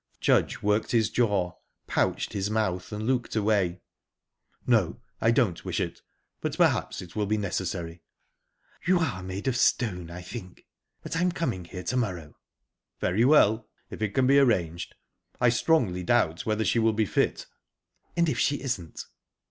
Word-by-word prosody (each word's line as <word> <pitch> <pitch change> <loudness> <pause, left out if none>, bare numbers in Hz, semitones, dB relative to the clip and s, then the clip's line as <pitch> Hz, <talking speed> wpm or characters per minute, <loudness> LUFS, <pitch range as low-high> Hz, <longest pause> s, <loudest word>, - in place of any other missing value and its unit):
Judge - - +2
worked 105 +3 +1
his 110 -2 +3
jaw, 100 -7 +1 0.3
pouched - - 0
his 100 -1 -1
mouth, 105 -4 -1
and 105 +1 -4
looked 125 -2 0
away. 100 -5 +1 0.8
"No, 110 -5 +2 0.2
I 110 - +4
don't 115 -8 +2
wish - - -2
it; - - -3 0.4
but - - -3
perhaps - - +1
it 90 -1 -13
will 105 -1 0
be 110 +1 +1
necessary." 85 -4 -3 0.9
"You 185 0 +5
are 130 - -1
made 95 +5 -5
of 130 - +1
stone, 90 -8 +1
I 90 +1 -8
think. 90 -2 -9 0.4
But - - -5
I'm 180 +2 +2
coming 125 - -2
here 90 +1 -8
to 130 - -1
morrow." 90 -11 -3 0.6
"Very 100 +6 +1
well 120 -6 +4 0.2
if - - -8
it 105 -2 -1
can 130 -1 +3
be 140 +2 +6
arranged. 85 -11 +1 0.4
I 125 - +5
strongly 120 - +2
doubt 85 0 +1
whether 110 0 +1
she 115 - +2
will 110 -1 +3
be 110 0 +1
fit." - - 0 0.7
"And 170 0 +3
if 155 - -1
she 145 - +2
isn't?" 105 - -4
105 Hz, 165 wpm, -27 LUFS, 90-120 Hz, 0.9 s, be